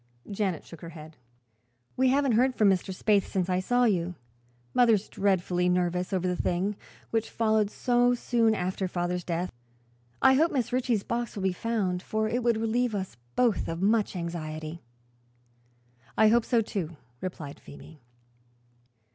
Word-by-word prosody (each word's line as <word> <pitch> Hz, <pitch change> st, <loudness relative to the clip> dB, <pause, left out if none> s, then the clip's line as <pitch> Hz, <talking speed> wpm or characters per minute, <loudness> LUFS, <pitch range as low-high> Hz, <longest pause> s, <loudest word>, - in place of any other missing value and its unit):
Janet 195 Hz, -5 st, -2 dB
shook 170 Hz, -, -12 dB
her 170 Hz, -, -7 dB
head. 155 Hz, +1 st, -11 dB, 0.8 s
"We 260 Hz, +1 st, +3 dB
haven't 275 Hz, 0 st, +3 dB
heard 250 Hz, +3 st, +3 dB
from 205 Hz, -2 st, +5 dB
Mr. 185 Hz, -2 st, 0 dB
Spaythe 200 Hz, +2 st, +2 dB
since 185 Hz, -2 st, -1 dB
I 180 Hz, 0 st, +2 dB
saw 245 Hz, +6 st, +2 dB
you. 180 Hz, -6 st, +1 dB, 0.6 s
Mother's 225 Hz, -4 st, +4 dB
dreadfully 180 Hz, -2 st, +1 dB
nervous 180 Hz, 0 st, 0 dB
over 185 Hz, -1 st, 0 dB
the 180 Hz, -, 0 dB
thing, 185 Hz, +4 st, -1 dB, 0.4 s
which 225 Hz, -1 st, 0 dB
followed 220 Hz, -2 st, +1 dB
so 245 Hz, +1 st, +2 dB
soon 230 Hz, -2 st, +2 dB
after 185 Hz, 0 st, -2 dB
father's 180 Hz, 0 st, -2 dB
death. 175 Hz, +1 st, -2 dB, 0.7 s
I 265 Hz, -, +6 dB
hope 315 Hz, +5 st, +4 dB
Mrs. 255 Hz, -6 st, -1 dB
Ritchie's 245 Hz, -4 st, +1 dB
box 235 Hz, -1 st, -3 dB
will 200 Hz, -, -4 dB
be 190 Hz, -1 st, +1 dB
found, 190 Hz, -3 st, -1 dB
for 220 Hz, +2 st, -1 dB
it 240 Hz, +3 st, -1 dB
would 235 Hz, -2 st, +2 dB
relieve 225 Hz, +1 st, 0 dB
us 190 Hz, -, -4 dB, 0.2 s
both 240 Hz, -4 st, +2 dB
of 165 Hz, +2 st, -3 dB
much 210 Hz, 0 st, +2 dB
anxiety." 160 Hz, -2 st, -5 dB, 1.4 s
"I 220 Hz, 0 st, +6 dB
hope 235 Hz, +1 st, +3 dB
so, 235 Hz, -3 st, +3 dB
too," 175 Hz, -7 st, -4 dB, 0.2 s
replied 155 Hz, -5 st, -6 dB
Phoebe. 150 Hz, +1 st, -13 dB
200 Hz, 155 wpm, -28 LUFS, 180-230 Hz, 1.4 s, I